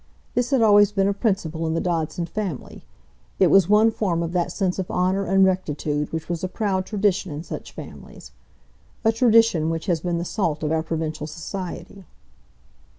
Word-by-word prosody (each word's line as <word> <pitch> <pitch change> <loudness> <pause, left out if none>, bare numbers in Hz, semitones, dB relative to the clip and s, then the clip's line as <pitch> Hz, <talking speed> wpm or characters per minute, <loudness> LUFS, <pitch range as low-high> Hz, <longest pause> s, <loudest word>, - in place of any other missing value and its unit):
This 245 0 0
had 265 -5 +3
always 205 -1 +6
been 195 -1 +1
a 200 - +1
principle 185 -7 -1
in 160 - -1
the - - +1
Dodson 170 -1 -2
family; 185 -6 -5 0.5
it - - +4
was 195 -2 +5
one 215 +2 +5
form 175 -6 -1
of 165 - -3
that 175 -1 0
sense 190 -2 -1
of 185 - -3
honour 185 +2 0
and 195 0 +4
rectitude 150 -5 -1
which 160 0 -4
was 175 0 -4
a - - 0
proud 190 -1 -2
tradition 200 -4 0
in 150 +2 -5
such - - -7
families,—a - - -7
tradition 225 -8 +4
which 165 0 -3
has 175 -4 +1
been 175 -1 -1
the 170 - -3
salt 170 -6 -2
of 150 - -1
our 160 0 +1
provincial 160 -2 -4
society. 185 +4 -7
180 Hz, 180 wpm, -23 LUFS, 160-200 Hz, 0.5 s, always